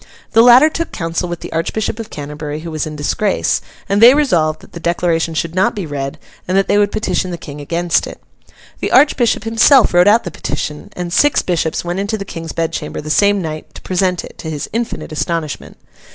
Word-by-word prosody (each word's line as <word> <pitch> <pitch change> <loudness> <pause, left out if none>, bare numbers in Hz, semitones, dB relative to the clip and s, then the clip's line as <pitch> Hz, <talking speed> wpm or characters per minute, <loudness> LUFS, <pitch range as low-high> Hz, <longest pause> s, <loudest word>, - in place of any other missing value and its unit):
The 225 - +6
latter 245 +5 +8
took 330 +1 -3
counsel 165 +1 -3
with 175 -1 -5
the - - -8
Archbishop 200 +7 -2
of 225 -1 -6
Canterbury, 150 +1 -6
who 165 0 -7
was 155 0 -2
in 155 - -7
disgrace; 185 +7 0 0.3
and 200 +2 +1
they 245 +4 +9
resolved 165 - +1
that - - -17
the 170 - -7
declaration 170 -1 0
should 165 +1 -2
not 190 +7 +1
be 200 -4 -4
read, 140 -2 -4 0.3
and 185 +2 +1
that 195 - +2
they 205 - +3
would 205 0 +2
petition 185 -4 -1
the 175 - -4
King 145 -2 -9
against 170 +3 0
it. - - -10 0.6
The - - -2
Archbishop 255 -5 +3
himself 225 +3 +4
wrote 175 +2 +5
out 220 +3 +5
the 175 - -5
petition, 150 +1 -5
and 175 -1 -4
six 290 +7 +3
bishops 165 -2 -1
went 175 +2 -2
into 205 +2 -2
the 200 - -6
King's 165 -4 -7
bedchamber 165 -1 -3
the 155 0 -5
same 200 +2 +3
night 155 -1 -7
to - - -10
present 185 -1 0
it, - - -14
to 160 - -6
his 150 -2 -4
infinite 230 -6 -3
astonishment. 155 -1 -3
175 Hz, 210 wpm, -17 LUFS, 160-210 Hz, 0.6 s, they